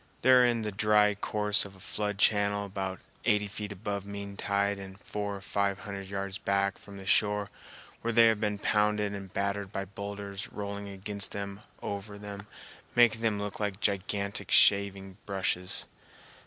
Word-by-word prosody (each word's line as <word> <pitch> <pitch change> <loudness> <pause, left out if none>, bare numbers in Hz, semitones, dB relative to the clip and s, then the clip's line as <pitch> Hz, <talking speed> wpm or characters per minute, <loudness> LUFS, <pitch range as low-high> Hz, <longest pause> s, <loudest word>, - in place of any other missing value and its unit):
They 130 - +6
are 125 -1 +8
in 120 -2 +3
the 105 - -2
dry 105 +1 +4
course 105 0 +2
of 100 -1 -8
a - - -16
flood 105 +2 -2
channel 100 0 +3
about 95 -2 -4 0.2
eighty 105 -1 +3
feet 105 0 -5
above 100 0 -3
mean 100 0 -6
tide 100 0 0
and 95 0 -9
four 100 0 -4
or 100 - -8
five 100 0 0
hundred 100 -2 -6
yards 100 -1 -3
back 100 0 +1
from 100 -1 -11
the 95 - -9
shore, 105 +1 +3 0.5
where 115 - 0
they 115 0 +7
have 110 -2 +4
been 105 -1 0
pounded 105 0 +2
and 100 -2 -7
battered 100 0 -1
by 100 -1 -3
boulders 100 0 -6
rolling 100 0 -5
against 100 +1 -4
them 100 0 -5 0.2
and - - -2
over 100 +1 -6
them, 100 0 -8 0.5
making 120 -2 +5
them 110 -2 +2
look 100 0 -4
like 105 -2 -1
gigantic 100 0 -1
shaving 100 -1 +4
brushes. 95 -2 -1
100 Hz, 175 wpm, -30 LUFS, 100-105 Hz, 0.5 s, are